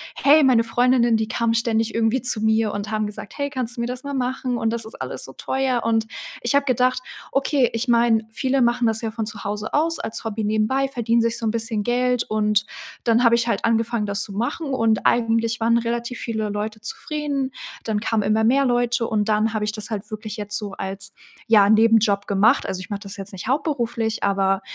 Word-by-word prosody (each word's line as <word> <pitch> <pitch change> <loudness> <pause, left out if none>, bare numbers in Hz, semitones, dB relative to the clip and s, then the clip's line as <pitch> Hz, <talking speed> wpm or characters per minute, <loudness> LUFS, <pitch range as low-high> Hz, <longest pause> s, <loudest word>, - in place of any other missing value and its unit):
„Hey, 295 +1 +5
meine 245 -4 +5
Freundinnen, 240 0 +3
die 220 0 -1
kamen 230 0 0
ständig 225 -1 0
irgendwie 230 +2 +1
zu 245 -3 0
mir 220 -1 +2
und 205 +1 -4
haben 215 0 0
gesagt: 205 -1 -8
‚Hey, 285 0 -1
kannst 255 -3 -3
du 235 - -4
mir 235 - -1
das 250 +1 -5
mal 280 0 -5
machen 255 -1 -2
und 225 -1 0
das 230 -1 -3
ist 220 - -10
alles - - -4
so - - -11
teuer.’“ 265 -2 -1
Und 225 -1 +1 0.3
ich 240 +4 0
habe 280 0 +3
gedacht: 255 0 +1 0.3
„Okay, 275 -2 +2
ich 230 +3 -2
meine, 235 -2 +3
viele 265 +3 0
machen 240 0 +2
das 220 0 +1
ja 225 - -2
von 220 -1 -3
zu 210 -2 -8
Hause 210 +1 -4
aus 330 +3 +2
als 225 - -5
Hobby 220 -1 -3
nebenbei, 220 +6 +1
verdienen 235 -3 +1
sich 230 0 0
so 230 - -5
'n 215 - +1
bisschen 225 -2 -1
Geld“, 250 +1 +1
und 210 0 +1 0.4
dann 235 +1 +3
habe 235 0 +6
ich 235 0 0
halt 230 - 0
angefangen, 230 -1 +1
das 200 +1 0
zu 200 - -7
machen, 265 +7 -2
und 225 -3 +1
eigentlich 230 0 +2
waren 230 +1 +3
relativ 235 +1 -3
viele 220 -2 -3
Leute 210 +1 -4
zufrieden. 280 +2 -3 0.3
Dann 215 -2 -1
kamen 220 -1 0
immer 215 +2 +2
mehr 270 +4 +3
Leute 240 -1 +1
und 210 -1 0
dann 215 +1 +2
habe 210 -1 -1
ich 210 - -1
das 215 +1 -4
halt 210 -1 -5
wirklich 215 0 -6
jetzt 205 0 -2
so 205 -2 -5
als, 195 0 -5 0.3
ja, 210 -3 +6
Nebenjob 220 -2 +4
gemacht. 210 +6 +3
Also, 190 -1 -3
ich 185 - -9
mache 205 0 -4
das 200 -1 -8
jetzt 195 +1 -8
nicht 190 +4 -7
hauptberuflich, 240 -6 -1
aber 195 -1 +1
225 Hz, 220 wpm, -22 LUFS, 215-245 Hz, 0.4 s, habe